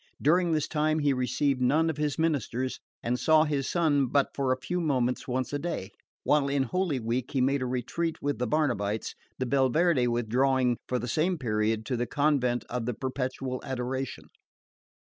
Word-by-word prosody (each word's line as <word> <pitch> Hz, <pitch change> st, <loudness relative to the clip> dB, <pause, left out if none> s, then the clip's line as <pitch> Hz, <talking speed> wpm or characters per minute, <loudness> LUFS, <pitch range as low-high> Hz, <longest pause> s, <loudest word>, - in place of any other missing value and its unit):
During 175 Hz, +3 st, +3 dB
this 155 Hz, -2 st, +1 dB
time 155 Hz, 0 st, +1 dB
he 145 Hz, -2 st, +2 dB
received 130 Hz, +1 st, 0 dB
none 150 Hz, +6 st, +3 dB
of 160 Hz, -2 st, -2 dB
his 150 Hz, -2 st, -1 dB
ministers, 130 Hz, -5 st, -1 dB, 0.2 s
and 125 Hz, +1 st, 0 dB
saw 155 Hz, -1 st, +5 dB
his 145 Hz, -3 st, -1 dB
son 150 Hz, -6 st, +2 dB
but 140 Hz, +3 st, +2 dB
for 135 Hz, -2 st, 0 dB
a 130 Hz, -, +1 dB
few 180 Hz, +7 st, -2 dB
moments 130 Hz, -6 st, 0 dB
once 130 Hz, 0 st, -2 dB
a 145 Hz, -, 0 dB
day; 140 Hz, -, -4 dB, 0.3 s
while 145 Hz, -1 st, +3 dB
in 140 Hz, -1 st, +1 dB
Holy 165 Hz, 0 st, -1 dB
Week 120 Hz, +2 st, -2 dB
he 135 Hz, -, +1 dB
made 135 Hz, +2 st, +2 dB
a 130 Hz, -, -1 dB
retreat 130 Hz, +7 st, -2 dB
with 145 Hz, -2 st, -2 dB
the 125 Hz, -, 0 dB
Barnabites, 110 Hz, -7 st, 0 dB, 0.2 s
the 130 Hz, -, -1 dB
Belverde 135 Hz, +2 st, +3 dB
withdrawing 125 Hz, +2 st, +2 dB
for 125 Hz, -, 0 dB
the 120 Hz, 0 st, -4 dB
same 170 Hz, +8 st, +1 dB
period 110 Hz, -3 st, 0 dB
to 125 Hz, -, -1 dB
the 120 Hz, 0 st, -1 dB
convent 140 Hz, -5 st, +1 dB
of 120 Hz, -1 st, -3 dB
the 125 Hz, -, -1 dB
Perpetual 130 Hz, 0 st, -3 dB
Adoration. 130 Hz, +1 st, -4 dB
130 Hz, 185 wpm, -28 LUFS, 125-150 Hz, 0.3 s, saw